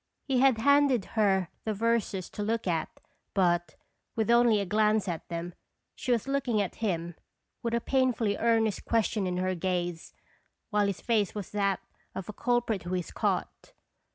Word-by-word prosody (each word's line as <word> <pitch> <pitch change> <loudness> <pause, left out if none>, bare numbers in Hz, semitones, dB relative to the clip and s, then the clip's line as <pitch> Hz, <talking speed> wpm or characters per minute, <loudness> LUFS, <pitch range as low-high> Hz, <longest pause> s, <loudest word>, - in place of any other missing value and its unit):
He 265 -3 +2
had 265 -3 +5
handed 280 -3 +4
her 195 -5 +2
the 215 -1 -2
verses 220 -4 0
to - - -5
look 225 +2 -1
at, 170 -3 0 0.5
but, 175 -3 +2 0.4
with 220 0 +1
only 235 -3 +5
a 200 - -1
glance 210 +1 +2
at 170 -3 -4
them, 170 +1 -4 0.4
she 255 - -3
was 235 +1 +1
looking 270 -5 0
at 200 -3 -2
him 175 -5 -1 0.5
with 235 0 -1
a 235 - 0
painfully 245 -5 +1
earnest 225 -2 +1
question 220 -3 +1
in 180 0 -2
her 185 +1 0
gaze, 175 -2 -3 0.6
while 205 -1 +2
his 200 - -3
face 215 -4 +1
was 205 -3 -5
that 200 -2 0 0.3
of 190 - -5
a 210 - -6
culprit 240 -4 0
who 180 +1 -3
is 180 -2 -3
caught. - - -2
210 Hz, 170 wpm, -29 LUFS, 185-230 Hz, 0.6 s, had